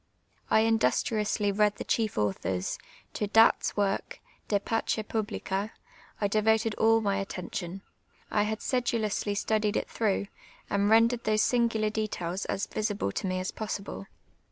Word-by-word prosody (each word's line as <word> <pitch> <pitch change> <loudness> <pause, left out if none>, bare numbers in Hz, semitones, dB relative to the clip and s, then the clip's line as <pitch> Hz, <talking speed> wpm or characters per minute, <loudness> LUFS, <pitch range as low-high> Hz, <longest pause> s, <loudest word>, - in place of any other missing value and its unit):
I 220 - +5
industriously 215 - +1
read 210 0 +2
tlie - - -7
chief 220 - 0
authors; 95 -3 -1 0.3
to 210 - -2
Datt's 225 +1 +4
work, 200 -1 -1 0.3
I)e 205 - +3
Vacp 225 +3 -2
Piihlica, 210 -2 -2 0.5
I 205 - +2
devoted 220 +2 +2
all 225 0 +5
my 200 -2 0
attintion; 185 -1 -6 0.5
I 210 - +2
had 215 +1 -1
si'duloiLsly 220 -5 0
studied 215 -1 +1
it - - -2
throuu^h, 200 -2 0 0.4
and 200 0 +2
rendered 230 +2 +4
those 215 0 +3
sing^ar 225 -3 +1
details 195 -4 -2
as 195 - -1
visible 210 - -2
to 190 - -3
me 185 0 -1
as 185 - -3
possible. 200 - -5
210 Hz, 140 wpm, -28 LUFS, 195-220 Hz, 0.5 s, I